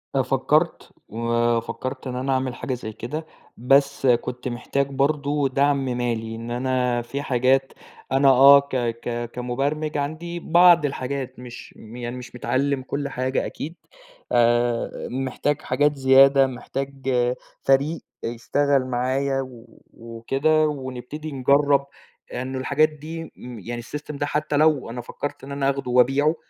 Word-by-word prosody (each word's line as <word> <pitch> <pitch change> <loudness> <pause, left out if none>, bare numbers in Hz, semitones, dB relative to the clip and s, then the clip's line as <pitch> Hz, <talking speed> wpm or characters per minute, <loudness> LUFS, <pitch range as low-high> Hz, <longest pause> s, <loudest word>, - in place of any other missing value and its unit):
أنا - - +3
فكّرت، - - +1 0.2
وفكّرت 115 +3 -1
إن 125 - -4
أنا 130 +2 -2
أعمل 130 -1 -1
حاجة 130 - -4
زي 115 -3 -5
كده، 150 +8 -5 0.3
بس 135 +3 +2
كنت 125 +1 0
محتاج 135 +3 -1
برضه 140 0 0
دعم 140 0 +2
مالي. 120 -3 -2
إن 115 +1 -7
أنا 125 -1 0
في 135 +4 -5
حاجات 130 0 +1 0.4
أنا 135 +1 +4
آه، 140 +2 +8
ك 140 -1 -7
ك 120 -1 -2
كمُبَرمِج 140 +5 -2
عندي 160 +4 -4
بعض 170 -1 +5
الحاجات 130 -1 -4
مش 125 -1 -10
م 110 +2 -12
يعني 120 0 -5
مش 125 0 -10
متعلّم 135 +2 0
كل 140 +2 -3
حاجة 130 0 -1
أكيد. 160 +4 -6 0.6
آآ 120 0 +1
محتاج 135 +3 -2
حاجات 145 0 +1
زيادة، 135 0 +6
محتاج 135 +1 -5 0.5
فريق 140 +4 +2 0.2
يشتغل 135 +3 0
معايا 130 +2 0
و 120 -3 -12
وكده 135 +7 0
ونبتدي 140 +2 -6
نجرّب 140 +1 +3 0.5
لأن 130 +1 -4
الحاجات 140 +4 +2
دي 155 +2 -8
م 125 -2 -9
يعني 120 +4 -6
السيستم 150 +4 -7
ده 145 - -1
حتّى 150 0 -1
لو 150 -5 +3
أنا 120 +1 -5
فكّرت 145 +3 -6
إن 140 - -8
أنا 140 -1 0
أخدُه 140 -2 -3
وأبيعه 135 +6 +3
135 Hz, 140 wpm, -23 LUFS, 125-140 Hz, 0.6 s, آه